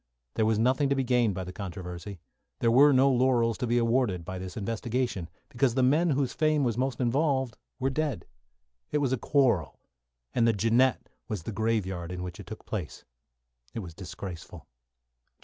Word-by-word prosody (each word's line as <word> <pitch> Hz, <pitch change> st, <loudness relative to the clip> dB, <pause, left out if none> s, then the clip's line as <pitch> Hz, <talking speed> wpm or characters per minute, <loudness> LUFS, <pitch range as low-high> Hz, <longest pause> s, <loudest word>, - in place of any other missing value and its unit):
There 110 Hz, -, +1 dB
was 110 Hz, -1 st, +2 dB
nothing 130 Hz, +5 st, +2 dB
to 140 Hz, -, +2 dB
be 135 Hz, -, +1 dB
gained 120 Hz, -5 st, +2 dB
by 95 Hz, -, -3 dB
the 90 Hz, 0 st, -8 dB
controversy. 90 Hz, 0 st, -7 dB, 0.4 s
There 115 Hz, -, +2 dB
were 140 Hz, +5 st, +7 dB
no 135 Hz, 0 st, +5 dB
laurels 120 Hz, -3 st, +2 dB
to 125 Hz, -, -1 dB
be 120 Hz, +1 st, +2 dB
awarded 115 Hz, -7 st, +1 dB
by 95 Hz, +1 st, -5 dB
this 95 Hz, +2 st, -7 dB
investigation, 115 Hz, -3 st, -2 dB, 0.2 s
because 125 Hz, 0 st, 0 dB
the 130 Hz, -, +3 dB
men 155 Hz, +7 st, +3 dB
whose 135 Hz, -3 st, 0 dB
fame 155 Hz, -2 st, +2 dB
was 120 Hz, -4 st, +1 dB
most 130 Hz, 0 st, -1 dB
involved 130 Hz, -1 st, +1 dB, 0.2 s
were 135 Hz, +1 st, 0 dB
dead. 145 Hz, -, -2 dB, 0.7 s
It -, -, +1 dB
was 140 Hz, -3 st, +1 dB
a -, -, +1 dB
quarrel, 115 Hz, -, +1 dB, 0.5 s
and 115 Hz, -1 st, +3 dB
the 115 Hz, -, +4 dB
"Jeannette" 115 Hz, +5 st, +2 dB, 0.2 s
was 105 Hz, -8 st, -4 dB
the 115 Hz, -, -5 dB
graveyard 95 Hz, -5 st, -1 dB
in 90 Hz, 0 st, -5 dB
which 90 Hz, -1 st, -7 dB
it -, -, -10 dB
took 110 Hz, +1 st, -9 dB
place. 95 Hz, -9 st, -5 dB, 0.7 s
It 115 Hz, -, -2 dB
was 85 Hz, -4 st, -9 dB
disgraceful. 90 Hz, -2 st, -8 dB
115 Hz, 185 wpm, -28 LUFS, 95-130 Hz, 0.7 s, were